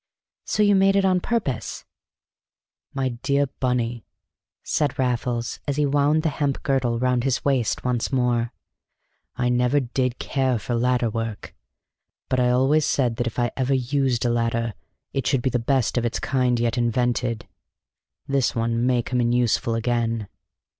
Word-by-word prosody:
"So 215 - +1
you 205 0 +5
made 195 0 +4
it 195 -1 +3
on 185 -1 +3
purpose!" 175 - -3 1.1
"My 135 -1 -1
dear 140 +4 0
Bunny," 120 -3 -1 0.6
said 145 -3 0
Raffles, 120 -2 -1
as 140 - 0
he 150 - +3
wound 145 +2 +2
the 160 - +2
hemp 140 -2 -2
girdle 130 -4 +1
round 125 0 +1
his 135 -2 -1
waist 130 -5 +1
once 125 0 0
more, 120 -2 +1 0.8
"I 125 0 0
never 125 +3 +2
did 125 -1 -1
care 130 -3 0
for 110 +3 -4
ladder 120 -1 +1
work, 115 -2 -5 0.8
but 130 - +1
I 125 0 +3
always 135 +5 +3
said 120 -5 +1
that 120 - -1
if 115 - -5
I 120 -2 +1
ever 135 +1 +1
used 130 -1 0
a 120 - +2
ladder 115 -1 0 0.4
it 135 -3 -1
should 130 -3 +1
be 130 - +1
the 125 - +1
best 125 0 +1
of - - -3
its 115 - -1
kind 125 -3 +1
yet 120 +1 0
invented. 120 0 0 0.8
This 140 -2 +1
one 115 0 0
may 125 -2 +2
come 125 +1 -1
in 120 0 +1
useful 120 -1 +1
again." 115 -2 -1
125 Hz, 165 wpm, -23 LUFS, 120-135 Hz, 1.1 s, you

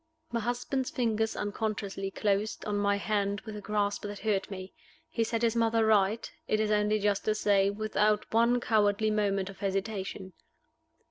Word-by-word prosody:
My 235 - 0
husband's 245 +3 -2
fingers 225 -2 0
unconsciously 205 -2 -3
closed 205 +1 -1
on 210 - -1
my 200 0 +2
hand 200 0 -1
with 215 -1 -8
a 210 - -6
grasp 205 -1 -1
that 205 0 -5
hurt 200 -2 -1
me. 185 -1 -7 0.3
He 250 -8 -1
set 230 +1 -1
his 230 0 +2
mother 225 -1 +3
right, 215 +1 +3 0.2
it 215 - +1
is 215 0 +1
only 210 0 +3
just 205 -1 +1
to 215 - +2
say, 200 -2 +3
without 210 0 +1
one 235 +2 +4
cowardly 215 -2 +2
moment 200 -2 0
of 195 - -16
hesitation. 195 -1 -3
210 Hz, 165 wpm, -30 LUFS, 200-220 Hz, 0.3 s, one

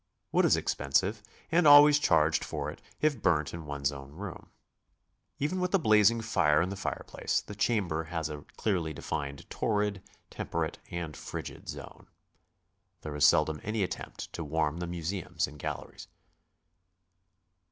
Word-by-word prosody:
Wood - - +4
is - - +4
expensive, 95 +10 0 0.3
and 170 -1 +4
always 145 0 +9
charged 75 - +3
for - - -4 0.3
if 150 -7 +1
burnt 80 -5 +2
in 85 -3 -7
one's 70 -1 -1
own 70 0 -10
room. 95 +2 -8 0.9
Even 155 +6 -1
with 180 +1 +1
a - - +7
blazing 110 - +4
fire 90 -9 +3
in 85 +3 +1
the 100 - -4
fire 95 - -4
place, - - -1
the - - -9
chamber 100 -7 0
has 80 -1 -3
a 75 -1 -6 0.2
clearly 85 -7 0
defined 70 -2 -5
torrid, 105 -3 0 0.3
temperate, 80 -1 -3
and 85 -3 -5
frigid - - -7
zone. - - -9 0.9
There 75 -1 -6
is 75 0 +6
seldom 75 -2 +3
any 110 0 -1
attempt 90 - -6
to 85 - -4
warm 80 0 0
the 90 0 -4
museums 85 0 -2
and 75 +2 -12
galleries. - - -6
85 Hz, 150 wpm, -30 LUFS, 75-105 Hz, 0.9 s, always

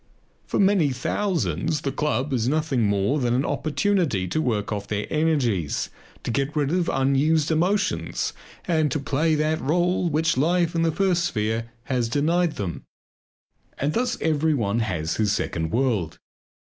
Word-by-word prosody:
For - - -1
many 195 -6 +4
thousands 135 - -1
the 135 - -2
club 140 -1 -1
is 120 -1 +1
nothing 145 -6 +1
more 100 +8 +1
than 120 -2 +1
an 135 +3 +1
opportunity 155 - 0
to 155 - 0
work 110 -5 -1
off 100 -1 -3
their 105 -1 -2
energies, 130 - 0 0.3
to - - -2
get 140 +4 -1
rid 145 -1 +1
of 175 -1 +1
unused 140 +4 +2
emotions 160 - 0 0.3
and 155 -3 +2
to 150 - 0
play 150 +3 +1
that 155 +1 0
role 175 +4 +1
which 160 -1 +1
life 170 +4 +2
in 165 - 0
the 165 0 +2
first 175 0 +1
sphere 110 -4 -1
has 125 -3 -1
denied 165 +6 +1
them. 85 -8 -4 1.0
And 145 +3 -1
thus 245 +2 0
everyone 145 -9 +1
has 90 -7 -2
his 105 -2 +2
second 80 -5 -2
world. 110 -7 0
145 Hz, 155 wpm, -24 LUFS, 115-160 Hz, 1.0 s, many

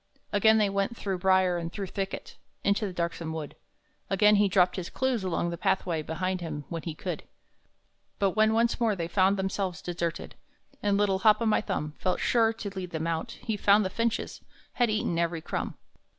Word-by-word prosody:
Again 220 +2 +5
they 210 -1 +3
went, 200 +4 -1
through 195 -3 -3
brier 185 -1 +3
and 165 0 -5
through 200 +1 -4
thicket, 195 +1 -5 0.3
Into 200 +1 +1
the - - -5
darksome 170 -2 -3
wood; 155 -2 -6 0.5
Again 210 +2 +5
he 205 0 +4
dropped 180 -2 +3
his 180 -2 -4
clues 260 -5 0
along 175 -1 -1
the 170 - -6
pathway 170 -4 0
Behind 185 +4 -2
him 150 -4 -5
when 165 -1 -4
he 160 -2 -5
could. - - -4 1.0
But 195 -1 +2
when 215 +3 +3
once 235 +2 +2
more 225 -3 +2
they 170 -3 -3
found 190 +3 +3
themselves 190 -2 -2
deserted, 170 -1 -4 0.5
And 205 -1 +2
little 200 -2 +2
Hop 215 0 +5
o' 230 - -1
my 220 - +3
Thumb 150 -8 -3
Felt 185 -1 0
sure 225 -2 +3
to 225 -2 -6
lead 185 -2 -4
them 160 -1 -3
out, 165 +8 -2
he 225 -3 -1
found 205 0 +4
the 185 - -2
finches 230 +1 -2 0.3
Had 245 -2 +2
eaten 210 -5 0
every 170 -1 0
crumb! - - -4
190 Hz, 195 wpm, -28 LUFS, 170-210 Hz, 1.0 s, Again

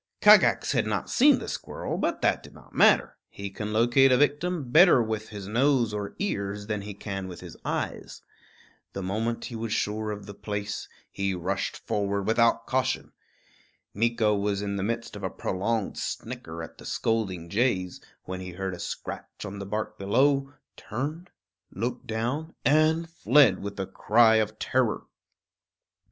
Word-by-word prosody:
Kagax - - +6
had - - +1
not - - -2
seen - - +6
the - - -6
squirrel; - - -4
but - - -1
that - - +2
did - - -14
not - - -17
matter; - - +4
he 100 0 -7
can 105 +2 -5
locate 120 +5 +4
a 125 - +5
victim 145 -1 0
better 170 -2 +7
with 110 -2 -2
his 100 -3 -7
nose 120 0 +2
or 105 -1 -4
ears 105 - -2
than 105 -1 -2
he 100 0 -7
can 95 -2 -5
with 90 -2 -9
his - - -10
eyes. - - -4 0.7
The 95 - -4
moment 110 +5 -2
he 120 - -7
was 115 -1 -4
sure 105 +1 -1
of 105 -1 -5
the 100 - -8
place, 105 0 -5 0.2
he 100 -1 -1
rushed 95 +3 -2
forward 100 -1 -1
without 115 +1 +3
caution. 130 -1 -1 0.8
Meeko 110 -1 +2
was 100 0 -1
in 100 0 -2
the 100 - -2
midst 115 +2 -3
of 100 - -7
a 95 - -2
prolonged 100 +4 -2
snicker 80 +1 -5
at 80 - -11
the - - -11
scolding 95 -7 -1
jays, 95 -3 0 0.2
when 95 0 -5
he 90 -1 -7
heard 95 +1 -3
a 90 - -8
scratch - - -6
on 100 0 -6
the 100 - -6
bark 105 +2 -4
below, 135 +7 +2 0.2
turned, 150 - -5 0.4
looked 120 +3 -4
down, 125 +9 -3
and 155 +4 +3
fled 140 - +4
with 100 0 -6
a 95 - -1
cry 110 +4 +4
of 110 0 0
terror. 125 -2 0
110 Hz, 170 wpm, -27 LUFS, 100-120 Hz, 0.8 s, better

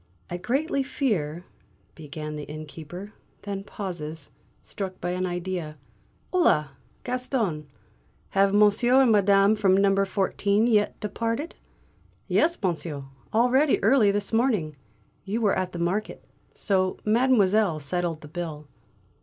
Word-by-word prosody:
"I 175 - -2
greatly 275 - 0
fear 180 - -2 0.3
" 95 -1 -37
began 150 0 -7
the 150 -1 -6
innkeeper, 155 +6 -9 0.3
then 200 -1 -4
pauses, 165 -7 -6 0.3
struck 190 -2 -6
by 175 - -2
an 185 +1 -1
idea. 175 -3 -4 0.6
"Holà, 150 - +3 0.3
Gaston! 245 - -2 0.6
Have 195 0 +3
monsieur 210 +5 +4
and 245 - +4
madame 200 0 +4
from 195 -3 +3
number 195 0 +3
fourteen 200 +2 +1
yet 215 -3 +2
departed?" 230 - -3 0.7
"Yes, 340 +2 +2
monsieur; 160 -5 -2 0.3
already 255 +6 +3
early 220 -1 +5
this 205 +2 -1
morning; 220 - +1 0.5
you 205 +4 -2
were 210 -4 +2
at 185 -1 -2
the 175 - -7
market, 175 +5 -2 0.3
so 185 -2 0
Mademoiselle 215 -6 +3
settled 165 +2 -2
the 150 - -10
bill." 155 -2 -6
195 Hz, 125 wpm, -26 LUFS, 165-220 Hz, 0.7 s, early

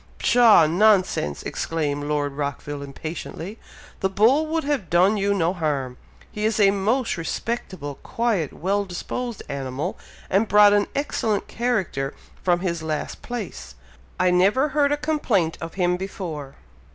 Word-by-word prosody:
"Pshaw! 230 -8 +6
nonsense!" 185 - +2
exclaimed 145 -3 -2
Lord 145 -1 -1
Rockville 145 0 -4
impatiently. 160 +7 -7 0.4
"The 190 - +1
bull 240 +11 +3
would 320 +1 -1
have 280 - -1
done 185 +5 +4
you 200 -1 +1
no 175 -3 +1
harm! 140 -7 -2 0.3
He 210 - -5
is 220 0 +1
a 200 -1 +6
most 215 +4 0
respectable, 165 - -4
quiet, 220 - -1
well 200 +4 -1
disposed 225 +5 -5
animal, 135 0 -4 0.3
and 200 +4 +2
brought 205 0 +7
an 205 0 +3
excellent 225 -7 -1
character 190 - -1 0.3
from 175 -1 +2
his 170 -3 -2
last 155 -1 -4
place! 230 - -6 0.4
I 185 0 +4
never 200 +11 +3
heard 290 0 +2
a 290 - +2
complaint 245 - 0
of 165 0 -6
him 180 -1 +1
before!" 165 -7 -6
190 Hz, 140 wpm, -23 LUFS, 155-220 Hz, 0.4 s, brought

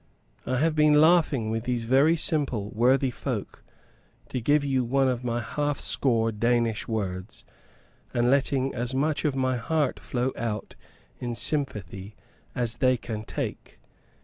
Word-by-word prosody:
I 130 - 0
have 155 +3 +1
been 150 -1 +5
laughing 155 -8 +3
with 115 +1 -3
these 120 -2 -2 0.4
simple 130 -10 0
worthy 130 +3 +2
folk - - -5 0.7
to 125 - -3
give 145 +5 +3
you 135 -2 +1
one 135 +3 +2
of 125 -1 -1
my 120 -1 -1
half 145 +4 -2
score 115 -4 +1
Danish 115 0 0
words 100 -3 -4 0.7
and 120 +1 +2
letting 135 -1 +1
as 120 +2 -3
much 150 +3 0
of 145 -3 +1
my 130 -1 0
heart 145 +3 -1
flow 125 +1 -2
out 105 -3 -4 0.4
in 120 -1 -4
sympathy 105 - -2 0.4
as 120 -2 -1
they 130 -1 +3
can 110 -2 -6
take. - - -6
125 Hz, 145 wpm, -26 LUFS, 115-140 Hz, 0.7 s, been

